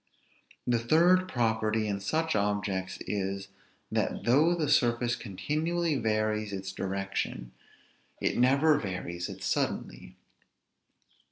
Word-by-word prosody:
The 120 -2 +2
third 175 +9 +4
property 110 -4 +1
in 100 -1 -1
such 160 +10 0
objects 100 -2 -1
is, 95 -1 -3 0.4
that - - -1
though 150 +8 +4
the 160 -3 -1
surface 120 -3 +2
continually 155 - -1
varies 110 -2 0
its 95 -1 -4
direction, 95 -10 -3 0.7
it - - 0
never 140 +5 +4
varies 90 -4 -4
it - - -8
suddenly. - - -2
110 Hz, 105 wpm, -29 LUFS, 100-145 Hz, 0.7 s, third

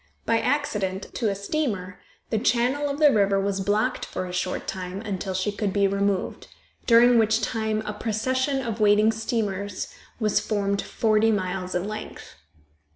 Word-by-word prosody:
By 230 - +3
an - - -2
accident 210 -9 -1
to 225 -4 0
a 200 - -1
steamer, 200 -5 -3 0.3
the 220 - +1
channel 255 +5 +1
of 280 - -3
the 300 -1 +6
river 200 -1 +3
was 195 0 -1
blocked 205 +2 0
for - - -4
a 180 - -7
short 180 0 -2
time, 185 0 -5
until 195 -3 -4
she 190 +3 0
could 205 -1 -2
be 200 +1 +2
removed, 200 -1 -1 0.4
during 235 0 +6
which 220 0 +3
time 220 -1 -1
a 210 - -3
procession 260 +6 -1
of 230 -2 -4
waiting 210 +1 +5
steamers 205 -3 -3 0.3
was 215 -3 +2
formed 200 -1 -1
forty 220 0 +2
miles 185 -2 -2
in 180 +3 -1
length. 215 0 -7
210 Hz, 165 wpm, -25 LUFS, 195-230 Hz, 0.4 s, the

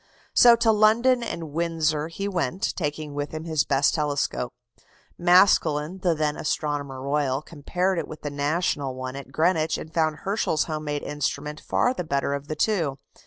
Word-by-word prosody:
So 240 -1 +8
to 230 -1 +3
London 225 +4 +4
and 165 -9 -5
Windsor 160 -1 0
he 195 +5 -4
went, 180 -2 -1
taking 150 -2 -3
with 145 0 -3
him 155 - -5
his 160 -3 +1
best 140 0 +2
telescope. 145 -5 -1 0.6
Maskelyne, 175 -2 +3
the 175 -3 +2
then 150 -1 -1
Astronomer 145 -3 -2
Royal, 140 0 -1
compared 180 +4 -1
it 160 - -4
with 155 - -10
the 145 - -3
National 145 -2 -1
one 130 0 -5
at 135 -1 -9
Greenwich, 160 +1 +1
and 160 - -9
found 160 -2 +1
Herschel's 195 -6 0
home 155 -1 -4
made 145 -1 -3
instrument 150 +1 -3
far 250 - +1
the 210 - -4
better 140 -3 -1
of 140 0 -5
the 155 - -3
two. 160 -6 0
155 Hz, 170 wpm, -25 LUFS, 145-175 Hz, 0.6 s, So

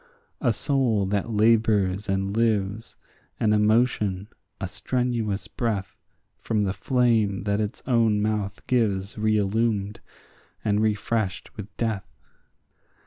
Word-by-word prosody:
A - - +3
soul 125 -8 +1
that 100 +3 -1
labours 105 -3 +2
and 95 +1 -1
lives, 110 -1 0 0.4
an 105 -1 +3
emotion, 105 -2 +2 0.3
a - - -3
strenuous 120 -5 -2
breath, 105 -5 -3 0.4
From 110 -2 0
the 95 -2 0
flame 110 -2 +1
that 100 +1 0
its 105 +4 -4
own 115 -4 +3
mouth 105 0 -2
gives 100 -6 0
reillumed, 105 -1 0 0.7
and 105 0 +2
refreshed 110 -1 -1
with 105 -2 -7
death. 110 -4 -3
105 Hz, 110 wpm, -25 LUFS, 100-115 Hz, 0.7 s, A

